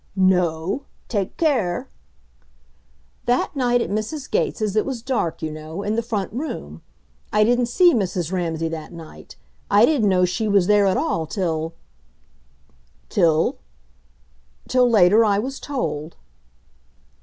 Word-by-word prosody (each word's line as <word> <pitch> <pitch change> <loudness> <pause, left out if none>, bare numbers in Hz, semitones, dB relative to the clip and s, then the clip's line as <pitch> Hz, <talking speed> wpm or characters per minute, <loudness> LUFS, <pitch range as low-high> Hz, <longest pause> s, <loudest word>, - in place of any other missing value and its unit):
"No? 185 - +1 0.2
Take 200 -5 -2
care!" 240 - 0 1.4
"That 245 +4 +1
night 245 -2 +2
at - - -3
Mrs. 215 +7 -4
Gates' 215 -2 0
it 215 - +3
was 255 -4 -5
dark, 240 -13 -2
you 155 - -2
know, 155 +5 -7
in 210 +1 -1
the 230 - +1
front 215 -5 -3
room. 230 - -5 0.5
I 210 0 +4
didn't 245 +2 +2
see 350 +8 +4
Mrs. 185 - -1
Ramsay 165 -3 -1
that 160 0 -7
night. 165 -2 -12 0.3
I 205 +3 +6
didn't 250 -9 +2
know 180 -1 +3
she 180 +5 -2
was 200 -3 +3
there 205 0 +4
at 190 - +2
all 160 -1 -1
till 165 -3 -2 0.6
" 65 -1 -37
"Till?" 160 -1 +2 1.1
"Till 250 -1 +3
later 210 0 +5
I 205 -2 +2
was 265 +6 -3
told." 170 - -4
195 Hz, 140 wpm, -22 LUFS, 165-235 Hz, 1.4 s, I